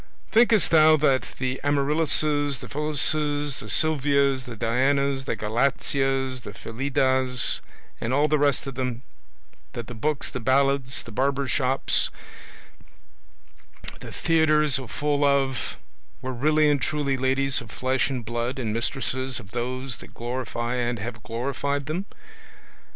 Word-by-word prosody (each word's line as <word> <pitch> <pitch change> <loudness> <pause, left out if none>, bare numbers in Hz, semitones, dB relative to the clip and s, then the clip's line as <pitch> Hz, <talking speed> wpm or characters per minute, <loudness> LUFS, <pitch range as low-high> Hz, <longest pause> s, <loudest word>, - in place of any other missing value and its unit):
Thinkest 225 -3 +4
thou 155 -1 +7
that 140 -3 +2
the 130 0 -2
Amarillises, 145 0 +1
the - - -10
Phillises, 150 -1 +1
the - - -7
Sylvias, 140 -4 +2
the 120 -3 -8
Dianas, 135 +4 +1
the 130 - -2
Galateas, 135 +4 0
the - - -9
Filidas, 130 0 +1 0.4
and 115 - -2
all 145 +3 +3
the 155 0 +2
rest 145 -2 +1
of 135 - -5
them, 125 -1 -3 0.7
that 120 - -5
the 120 - -8
books, 140 +6 -2
the - - -4
ballads, 130 +1 +2
the 115 - -11
barber's 135 +3 0
shops, 135 0 +1 1.9
the - - -9
theatres 155 -4 +2
are 130 - -7
full 145 +4 -1
of, 140 -2 +1 0.5
were 130 0 -3
really 150 +4 +3
and 145 -2 +2
truly 145 -3 0
ladies 135 +1 +1
of 115 - -11
flesh 130 +3 0
and 125 -4 -4
blood, 120 +3 -3
and 115 -5 -2
mistresses 130 +2 -1
of 105 -5 -13
those 125 +2 -3
that - - -14
glorify 120 0 -3
and 120 -1 -1
have 115 +2 -6
glorified 140 +5 -3
them? 165 +7 -3
135 Hz, 140 wpm, -25 LUFS, 125-145 Hz, 1.9 s, thou